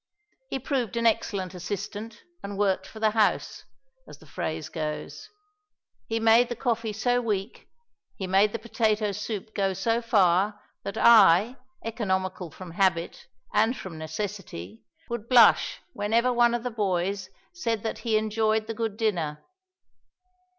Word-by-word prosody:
He - - -2
proved 255 -4 -2
an 235 - 0
excellent 195 -4 0
assistant 205 +4 -6 0.2
and 200 0 -6
worked 195 -2 +1
for 220 - -11
the 215 -1 +3
house 215 -1 0 0.4
as - - -12
the - - -18
phrase 160 -1 -4
goes 155 -2 -5 0.8
he 225 0 -1
made 225 +2 +5
the 240 - -3
coffee 230 -2 -1
so 245 +4 +1
weak, 210 -2 -3 0.5
he 190 - -4
made 195 +3 +3
the 230 - -3
potato 220 -2 0
soup 210 +1 -5
go 195 -2 0
so 225 +5 0
far, 200 -2 +2 0.2
that 200 0 -6
I, 225 +1 +6 0.3
economical 190 -5 -2
from 175 +3 -10
habit 175 -1 0 0.3
and 220 +4 +2
from 165 -4 -8
necessity, 160 - -6 0.3
would 235 -1 -5
blush 245 -3 +5
whenever 230 +5 +1
one 240 0 +4
of 240 - -3
the 250 - -3
boys 195 -2 -1 0.2
said 230 - -2
that 225 - -3
he 225 -3 +1
enjoyed 220 0 +1
the 225 - -4
good 220 -2 -3
dinner. 170 -10 -1
210 Hz, 145 wpm, -26 LUFS, 190-230 Hz, 0.8 s, I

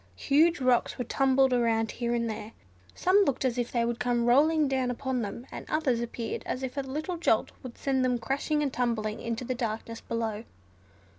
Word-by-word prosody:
Huge 315 - +3
rocks 255 -2 +2
were 250 - -1
tumbled 265 +1 +3
about 225 -2 +1
here 240 0 -2
and 235 -1 0
there. 220 0 -6 0.4
Some 370 +2 +3
looked 275 -6 0
as 250 -1 0
if 240 - -2
they 235 -1 +1
would 235 0 -2
come 240 -1 +1
rolling 300 +5 +4
down 260 -2 0
upon 255 0 -2
them; 220 +3 -5
and - - -6
others 270 -7 +1
appeared 235 -1 -4
as 260 - -3
if 260 0 -4
a 280 - 0
little 305 +6 -4
jolt 335 - +2
would 255 -3 -9
send 265 -2 0
them 250 -1 +2
crashing 280 +5 -1
and 275 -2 -2
tumbling 220 -3 -1
into 230 +1 -3
the 255 - -1
darkness 230 -1 -4
below. 225 -2 -3
250 Hz, 200 wpm, -28 LUFS, 235-270 Hz, 0.4 s, rolling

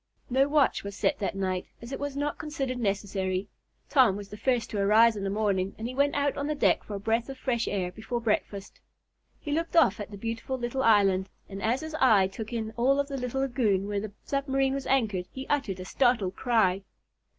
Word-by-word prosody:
No 265 +2 +4
watch 290 -1 +2
was 200 0 -6
set 285 +7 0
that 200 -1 -2
night, 185 -2 -2
as 235 +2 -10
it 270 - -4
was 285 -1 -4
not 290 +1 -2
considered 275 -5 -3
necessary. 195 -2 -1 0.4
Tom 255 -9 +4
was 200 0 -7
the - - -8
first 240 +1 0
to 210 - -2
arise 220 +3 +5
in 200 - -4
the 195 - -1
morning, 200 -2 0
and 225 - -4
he 250 - -5
went 280 +2 +2
out 285 0 +1
on 280 - -2
the 305 - -1
deck 200 -10 +2
for 210 - -6
a - - -4
breath 225 +4 0
of 270 - -7
fresh 240 -3 -1
air 185 -3 -1
before 220 +4 -4
breakfast. 210 -3 -2 0.6
He 295 - -6
looked 330 +3 -1
off 300 - +5
at 205 - -5
the 205 - -9
beautiful 230 +5 -4
little 240 +2 -2
island, 195 -5 +4 0.2
and 195 0 -7
as 235 +5 +1
his 315 0 -6
eye 215 -7 +6
took 210 +4 -6
in 225 -2 -3
all 270 +4 +3
of 280 0 -1
the 275 - -3
little 250 +1 -2
lagoon 225 -7 +1
where 205 -1 -1
the 215 -1 -6
submarine 270 -1 0
was 275 0 -4
anchored 215 -9 +1
he 265 0 -7
uttered 230 -11 0
a 185 - -6
startled 220 -5 +1
cry. 210 -7 +2
230 Hz, 225 wpm, -28 LUFS, 200-270 Hz, 0.6 s, eye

